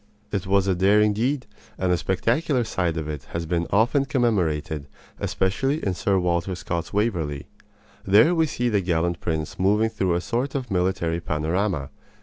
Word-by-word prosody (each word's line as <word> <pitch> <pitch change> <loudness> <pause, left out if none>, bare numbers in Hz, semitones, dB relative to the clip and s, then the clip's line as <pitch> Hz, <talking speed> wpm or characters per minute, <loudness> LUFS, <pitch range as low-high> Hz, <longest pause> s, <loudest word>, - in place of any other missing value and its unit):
It 100 -2 -2
was 100 0 +3
a 95 - +2
daring 105 +4 +4
deed, 125 +5 -1 0.3
and 95 -1 0
the 90 - +3
spectacular 120 - 0
side 90 -7 -1
of 80 -1 -3
it 75 -3 -5
has 85 0 -2
been 85 0 -1
often 120 +7 +3
commemorated, 90 - 0 0.3
especially 135 +11 0
in 95 - +1
Sir 95 +2 +1
Walter 90 +1 0
Scott's 85 -1 -4
Waverley. 85 -10 -1 0.6
There 105 - +5
we 160 -2 +2
see 125 -4 -1
the 105 -4 +2
gallant 85 -1 0
prince 80 -1 -3
moving 105 +4 +3
through 90 -5 0
a 85 - 0
sort 125 +7 -2
of 130 -5 -3
military 90 -2 0
panorama. 80 0 -1
95 Hz, 165 wpm, -24 LUFS, 85-110 Hz, 0.6 s, There